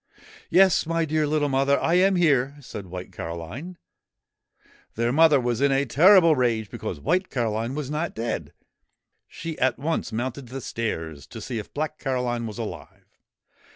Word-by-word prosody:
' - - -20
Yes, 185 -1 +4
my 165 0 +1
dear 155 -1 0
little 150 0 +1
mother, 135 +1 +2
I 165 - +1
am 190 +2 +4
here! 140 -6 +2
' - - -15
said 105 -8 -8
White 90 +1 -8
Caroline. 90 - -7 1.2
Their 115 +1 0
mother 155 0 +5
was 120 -1 -1
in 140 0 +4
a 135 +1 +2
terrible 165 - +6
rage 115 -5 0
because - - -5
White 185 - 0
Caroline 115 0 -2
was 150 -2 -4
not 155 +3 -2
dead. 115 +1 -3 0.8
She 165 -1 -7
at 130 - +2
once 160 +4 -2
mounted 125 +3 -4
the 130 +3 -6
stairs 80 - -4
to 115 - -9
see 115 +1 -4
if 105 - -9
Black 155 +1 -3
Caroline 125 -3 -2
was 105 - -8
alive. - - -9
135 Hz, 170 wpm, -25 LUFS, 115-155 Hz, 1.2 s, terrible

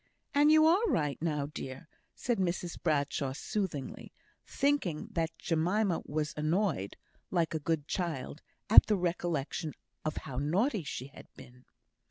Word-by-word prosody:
And 290 +1 +5
you 310 0 +7
are 345 +6 +5
right 150 - 0
now, 150 -4 0
dear!" 140 0 -7 0.3
said 240 -3 -1
Mrs 175 -1 -2
Bradshaw, 145 -4 0
soothingly, 155 -3 -4 0.4
thinking 275 - 0
that 165 -1 0
Jemima 180 +3 +1
was 150 +1 -2
annoyed 155 - 0 0.3
(like 170 -3 +1
a 160 - -1
good 150 -1 -1
child) 160 -4 -3 0.3
at 220 - +9
the 210 - +2
recollection 170 -3 -2 0.3
of 155 - -2
how 125 - -6
naughty 190 - +1
she 130 -3 -5
had - - -13
been. 125 +1 -15
165 Hz, 140 wpm, -31 LUFS, 145-195 Hz, 0.4 s, at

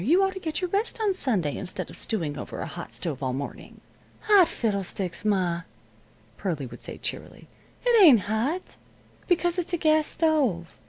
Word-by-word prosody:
You 340 - +4
ought 385 0 +1
to 380 - -6
get 320 -1 -3
your 365 - -1
rest 420 +4 0
on 420 -3 +2
Sunday 205 - +1
instead 180 - -4
of - - -9
stewing 165 -10 -1
over 130 - -7
a - - -3
hot - - -8
stove 135 +4 -4
all 130 -2 -1
morning." 140 +2 -7 0.4
"Hot 405 -5 +6
fiddlesticks, 195 -5 -3
ma," 185 -5 +1 0.8
Pearlie 165 -8 -2
would 125 - -10
say, - - -7
cheerily. - - -5 0.4
"It 475 -3 +5
ain't 265 - +8
hot, 230 - -2 0.5
because 350 0 +2
it's 355 +1 -4
a - - +2
gas 310 -1 +3
stove. 265 - 0
240 Hz, 175 wpm, -26 LUFS, -, 0.8 s, ain't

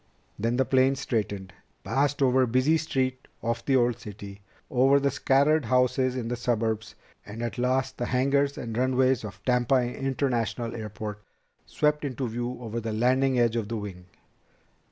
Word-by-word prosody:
Then 115 +3 0
the 130 - +3
plane 130 +1 +3
straightened, 105 -8 -3 0.3
passed 140 +1 +1
over 130 0 +4
the 130 - +3
busy 130 +6 +3
streets 130 -4 -1 0.2
of 115 0 -1
the 135 - +2
old 120 -2 +2
city, 100 -2 -9 0.3
over 135 +2 +4
the 140 0 +1
scattered 140 +2 +2
houses 125 +1 +2
in 120 -3 -3
the 120 - -2
suburbs, 110 -3 -1 0.3
and 110 +3 -7
at 120 +1 -4
last 130 +1 0
the 120 - -1
hangars 140 +2 +1
and 115 -2 -5
runways 130 0 +2
of 105 -3 -9
Tampa 125 0 +2
International 120 -2 -1
Airport 105 -1 -6 0.5
swept 150 0 +1
into 130 -2 -3
view 120 +2 -4
over 115 0 -4
the 110 -1 -4
leading 130 +3 +2
edge 120 -1 +2
of 115 -3 -1
the 115 +1 -3
wing. 95 -4 -8
125 Hz, 165 wpm, -27 LUFS, 115-130 Hz, 0.5 s, over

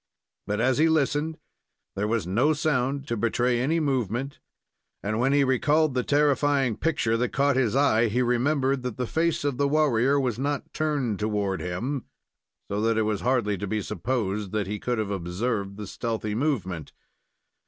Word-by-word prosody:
But, 105 0 -1
as 130 +1 +2
he 160 +1 +5
listened, 155 +1 +1 0.6
there 105 +2 -1
was 110 -4 0
no 120 - +2
sound 140 -2 0
to 120 - -1
betray 120 +2 +1
any 155 +7 +1
movement, 135 - -1 0.6
and 110 +2 -1
when 130 +3 +2
he 140 0 +4
recalled 145 +3 +2
the 125 - +1
terrifying 145 -3 +2
picture 115 -4 0
that 125 +1 0
caught 140 0 +2
his 125 -4 +1
eye, 120 -5 +4
he 120 +4 +1
remembered 130 +2 +1
that 125 -4 -5
the 125 - -1
face 165 +5 0
of 140 -3 -1
the 140 - +2
warrior 140 -2 +3
was 125 -4 -1
not 145 +1 -2
turned 145 -9 -1
toward 105 -2 -1
him, 120 +10 -3 0.6
so 100 +1 -2
that 115 0 +1
it 110 - +3
was 105 -2 -1
hardly 120 -6 +1
to 100 - -3
be 110 +3 -1
supposed 105 0 -2
that 105 -2 0
he 105 +2 -4
could 120 +2 -1
have 105 -2 -2
observed 100 +2 -2
the 105 - -6
stealthy 110 +1 -3
movement. 105 - -2
125 Hz, 175 wpm, -26 LUFS, 105-140 Hz, 0.6 s, he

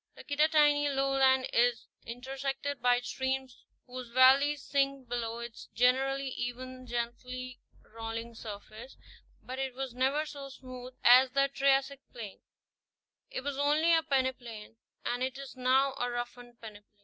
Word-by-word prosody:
The - - -11
Kittatinny 295 -1 +3
lowland 270 -1 +3
is 240 0 +2 0.2
intersected 270 +3 -4
by 245 0 +3
streams 265 0 -3 0.2
whose 255 -1 -8
valleys 270 +3 +5
sink 275 -2 0
below 230 -1 -3
its 235 -1 -8
generally 270 +2 +2
even, 255 +1 -6
gently 245 +2 -5 0.2
rolling 225 +1 -6
surface; 220 +3 -9 0.5
but 260 +1 -6
it 265 -2 -3
was 265 -2 -4
never 270 +5 +1
so 285 -2 -8
smooth 255 -1 -10
as 255 +2 +8
the 275 +2 +2
Triassic 275 0 +2
plain. 220 -5 -9 0.9
It - - -4
was 280 0 -4
only 305 +4 +3
a 325 - +5
pene 265 -4 +1
plain, 230 -3 -11 0.3
and 245 +1 -1
it 260 +1 -2
is 275 -1 -9
now 260 +2 +3
a 245 - 0
roughened 240 0 -6
peneplain. 210 -2 -10
255 Hz, 140 wpm, -31 LUFS, 245-275 Hz, 0.9 s, as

